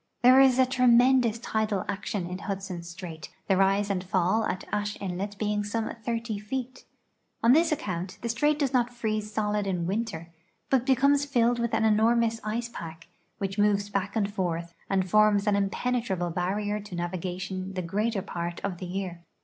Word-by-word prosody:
There 255 Hz, +2 st, +8 dB
is 260 Hz, -2 st, +5 dB
a 260 Hz, -, +5 dB
tremen 255 Hz, 0 st, +5 dB
dous 230 Hz, -2 st, 0 dB
tidal 220 Hz, -4 st, -1 dB
action 200 Hz, -1 st, -3 dB
in 180 Hz, +1 st, -5 dB
Hudson 195 Hz, -3 st, -4 dB
strait, 170 Hz, -2 st, -8 dB, 0.2 s
the 195 Hz, -, +3 dB
rise 195 Hz, +2 st, +2 dB
and 185 Hz, -2 st, -1 dB
fall 190 Hz, +3 st, +1 dB
at 185 Hz, -, -3 dB
Ashe 205 Hz, 0 st, -2 dB
inlet 200 Hz, +2 st, -4 dB
being 210 Hz, 0 st, 0 dB
some 220 Hz, +2 st, -2 dB
30 230 Hz, -2 st, -2 dB
feet. 255 Hz, +4 st, -5 dB, 0.6 s
On 230 Hz, -, +6 dB
this 320 Hz, +4 st, +4 dB
account 185 Hz, -, -3 dB
the 235 Hz, -, -2 dB
strait 295 Hz, +6 st, +2 dB
does 280 Hz, -3 st, 0 dB
not 245 Hz, -1 st, +2 dB
freeze 215 Hz, -3 st, -3 dB
solid 210 Hz, -1 st, -1 dB
in 180 Hz, -3 st, -1 dB
winter, 190 Hz, -4 st, -3 dB, 0.4 s
but 260 Hz, -2 st, +2 dB
becomes 280 Hz, +2 st, +4 dB
filled 240 Hz, -3 st, +2 dB
with 235 Hz, -1 st, 0 dB
an 225 Hz, 0 st, +2 dB
enormous 225 Hz, +1 st, +3 dB
ice 230 Hz, +2 st, -2 dB
i)ack, 165 Hz, -3 st, -8 dB, 0.3 s
which 195 Hz, +1 st, -3 dB
moves 205 Hz, 0 st, +2 dB
back 200 Hz, +1 st, -2 dB
and 205 Hz, -2 st, 0 dB
forth 170 Hz, -3 st, -2 dB, 0.2 s
and 190 Hz, -1 st, +1 dB
forms 210 Hz, +1 st, +4 dB
an 210 Hz, -1 st, +3 dB
impenetrable 200 Hz, -3 st, -1 dB
barrier 205 Hz, +4 st, -1 dB
to 205 Hz, -3 st, -8 dB
navigation 185 Hz, +2 st, -4 dB
the 185 Hz, -, -2 dB
greater 205 Hz, +3 st, -1 dB
])art 170 Hz, 0 st, -4 dB
of 185 Hz, -3 st, -3 dB
the 185 Hz, -, -5 dB
3'ear. 180 Hz, -1 st, -4 dB
205 Hz, 180 wpm, -27 LUFS, 185-235 Hz, 0.6 s, There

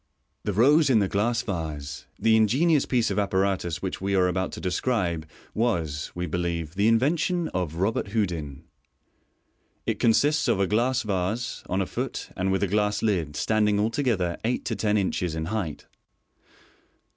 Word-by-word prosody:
The 105 Hz, -, 0 dB
Rose 145 Hz, -, +5 dB
in 125 Hz, -, +5 dB
the 100 Hz, -2 st, +2 dB
Glass 115 Hz, +5 st, 0 dB
Vase. 80 Hz, -, -5 dB
— -, -, -37 dB
The 110 Hz, -, +6 dB
ingenious 135 Hz, +8 st, +3 dB
piece 120 Hz, -3 st, +1 dB
of -, -, 0 dB
appa 100 Hz, -2 st, 0 dB
ratus 95 Hz, -3 st, 0 dB
which 95 Hz, -, -3 dB
we 100 Hz, +1 st, 0 dB
are 90 Hz, -1 st, +4 dB
about 95 Hz, +1 st, -1 dB
to -, -, -6 dB
desciibe 90 Hz, -4 st, -1 dB, 0.3 s
was, 80 Hz, -10 st, -1 dB
we 90 Hz, 0 st, -2 dB
believe, 85 Hz, -2 st, -2 dB
the 100 Hz, +3 st, +2 dB
invention 160 Hz, +9 st, +2 dB
of 90 Hz, -4 st, -3 dB
Robert 100 Hz, +6 st, 0 dB
Houdin. 85 Hz, -10 st, -2 dB, 1.2 s
It -, -, -1 dB
consists 145 Hz, +7 st, +3 dB
i -, -, +5 dB
a 100 Hz, -, +2 dB
glass 120 Hz, +6 st, +1 dB
vase, 105 Hz, +3 st, -2 dB
on 95 Hz, +2 st, +1 dB
a -, -, -4 dB
foot, -, -, -4 dB
and 95 Hz, +1 st, 0 dB
with 95 Hz, +1 st, +1 dB
a -, -, +2 dB
glass 105 Hz, +2 st, 0 dB
lid, 85 Hz, -9 st, 0 dB
standing 105 Hz, +1 st, +2 dB
altogether 110 Hz, -6 st, 0 dB
eight 120 Hz, +3 st, -1 dB
to 115 Hz, -, -1 dB
ten 105 Hz, -1 st, +1 dB
inches 90 Hz, -4 st, -1 dB
in 80 Hz, 0 st, -3 dB
height. 85 Hz, -9 st, -3 dB
100 Hz, 170 wpm, -26 LUFS, 90-115 Hz, 1.2 s, The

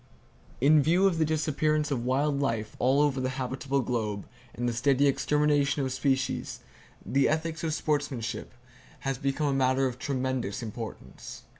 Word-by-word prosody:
In 150 Hz, +3 st, +5 dB
view 175 Hz, +6 st, +3 dB
of 180 Hz, -4 st, +2 dB
the 160 Hz, -, +3 dB
disappearance 155 Hz, 0 st, 0 dB
of 125 Hz, -4 st, -1 dB
wild 140 Hz, +3 st, +1 dB
life 115 Hz, -6 st, -2 dB
all 130 Hz, +3 st, +3 dB
over 140 Hz, -3 st, +1 dB
the 130 Hz, -, 0 dB
habitable 135 Hz, +1 st, -1 dB
globe, 110 Hz, -5 st, -2 dB, 0.3 s
and 120 Hz, +1 st, -2 dB
the 120 Hz, -, 0 dB
steady 135 Hz, +3 st, +2 dB
extermination 145 Hz, 0 st, +2 dB
of 130 Hz, -, -2 dB
species, 135 Hz, -1 st, -1 dB, 0.4 s
the 135 Hz, +1 st, +2 dB
ethics 160 Hz, +1 st, -2 dB
of 160 Hz, -, 0 dB
sportsmanship 145 Hz, -6 st, -2 dB, 0.5 s
has 135 Hz, -2 st, -2 dB
become 140 Hz, +2 st, -1 dB
a 140 Hz, -, +1 dB
matter 135 Hz, 0 st, +2 dB
of 125 Hz, -1 st, -3 dB
tremendous 130 Hz, -5 st, -2 dB
importance. 110 Hz, -, -8 dB
135 Hz, 155 wpm, -28 LUFS, 125-150 Hz, 0.5 s, In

